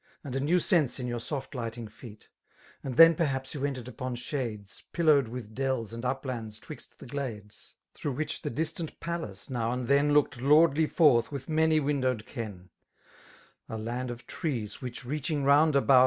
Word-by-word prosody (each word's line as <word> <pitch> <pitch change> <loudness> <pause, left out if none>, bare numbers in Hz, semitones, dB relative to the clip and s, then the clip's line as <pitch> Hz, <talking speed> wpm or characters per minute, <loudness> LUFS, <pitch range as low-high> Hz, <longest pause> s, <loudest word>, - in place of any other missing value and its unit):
And 135 -4 -5
a - - +1
new 150 +6 +3
sense 155 - +2
in 125 - -3
yoUr 120 -1 -3
soft 135 +1 -4
lighting 115 -2 -4
feet; 105 0 -13 0.6
And 130 -3 -4
then 165 0 +10
perhaps 135 -5 -1
you 145 - -5
ent4^ 135 -4 -2
upon 130 -1 -4
shades^ 120 -6 -4
Pillowed 155 -7 +4
with 115 -2 -7
dells 130 -3 -1
and 115 +1 -6
uplands 125 -4 -3
'twixt - - -11
the - - -11
glades^ 115 -6 -7 0.2
Through 145 - -3
which 155 +5 -3
the - - -3
distant 160 +4 -3
palace, 170 - -4
now 115 -2 0
and 125 -1 -3
then. 140 +1 +4
Looked 145 -4 +2
lordly 150 +2 +5
forth 135 -9 +4
with 140 -2 -6
many 160 0 +3
windowed 130 -6 0
ken; 100 -8 -7 1.0
A 110 - -4
land 120 +3 -3
of 120 0 -7
trees, 120 - -4
which 125 -1 -6
reaching 145 +2 -2
round 145 +2 +5
about. 135 -1 +6
130 Hz, 175 wpm, -29 LUFS, 120-150 Hz, 1.0 s, then